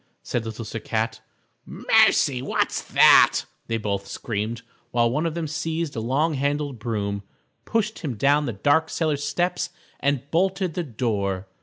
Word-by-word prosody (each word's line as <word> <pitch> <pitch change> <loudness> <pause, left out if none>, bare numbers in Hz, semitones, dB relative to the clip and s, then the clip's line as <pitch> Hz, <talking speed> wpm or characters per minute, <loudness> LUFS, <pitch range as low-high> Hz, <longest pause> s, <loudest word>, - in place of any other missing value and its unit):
said 120 - -2
Little 110 +1 -6
Sir 115 +2 -5
Cat. 110 +1 -2 0.4
"Mercy! 130 -3 +3
What's - - -1
that?" - - +7 0.3
they 115 - 0
both 100 -2 -3
screamed, 110 +3 -4 0.3
while 120 -1 +2
one 155 +6 0
of 165 - -4
them 170 -1 -2
seized 160 0 -3
a - - -2
long 140 +8 +1
handled 145 -2 -1
broom, 100 -3 -2 0.4
pushed 220 -1 -1
him 140 -8 -4
down 145 +6 +2
the - - -1
dark 145 +10 +2
cellar 155 -3 0
steps 175 +5 -1 0.3
and 140 -2 0
bolted 185 +1 +1
the 180 - -2
door. 105 - -2
140 Hz, 155 wpm, -24 LUFS, 110-160 Hz, 0.4 s, that